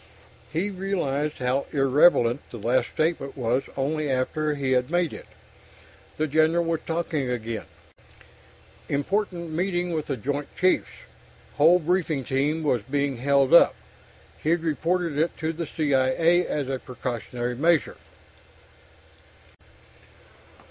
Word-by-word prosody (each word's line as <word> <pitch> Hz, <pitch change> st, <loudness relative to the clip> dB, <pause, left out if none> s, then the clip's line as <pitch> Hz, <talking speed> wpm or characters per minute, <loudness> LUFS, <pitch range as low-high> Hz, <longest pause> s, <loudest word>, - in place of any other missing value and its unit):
He 175 Hz, +6 st, -1 dB
realized 160 Hz, -7 st, -2 dB
how 130 Hz, +2 st, -1 dB
irrelevant 135 Hz, -3 st, +4 dB
the 120 Hz, -, -8 dB
last 120 Hz, +4 st, +1 dB
statement 155 Hz, -4 st, -2 dB
was 125 Hz, +1 st, +1 dB, 0.2 s
only 150 Hz, +2 st, -1 dB
after 150 Hz, +4 st, 0 dB
he 135 Hz, -2 st, -2 dB
had 125 Hz, 0 st, +2 dB
made 175 Hz, -1 st, 0 dB
it. -, -, -10 dB, 0.9 s
The 155 Hz, -, +1 dB
General 160 Hz, +3 st, +2 dB
was 165 Hz, -1 st, 0 dB
talking 160 Hz, -5 st, -2 dB
again... 115 Hz, -2 st, -4 dB, 1.2 s
important 170 Hz, +3 st, -1 dB
meeting 175 Hz, +1 st, -1 dB
with 155 Hz, -2 st, -3 dB
the 135 Hz, -, -2 dB
Joint 145 Hz, +5 st, -3 dB
Chiefs... 185 Hz, +1 st, +2 dB, 0.7 s
whole 160 Hz, +5 st, +6 dB
briefing 165 Hz, -4 st, 0 dB
team 145 Hz, +5 st, 0 dB
was 125 Hz, -6 st, +1 dB
being 140 Hz, +3 st, -1 dB
held 140 Hz, +1 st, +2 dB
up... 170 Hz, -, +7 dB, 0.7 s
he'd 165 Hz, +2 st, +1 dB
reported 165 Hz, 0 st, -1 dB
it 165 Hz, +2 st, 0 dB
to 160 Hz, +1 st, -2 dB
the 165 Hz, 0 st, -5 dB
C.I.A. 155 Hz, +4 st, +2 dB
as 145 Hz, -3 st, -2 dB
a 135 Hz, -1 st, -2 dB
precautionary 125 Hz, -1 st, -4 dB
measure.... 160 Hz, +4 st, +2 dB
150 Hz, 120 wpm, -25 LUFS, 130-170 Hz, 1.2 s, up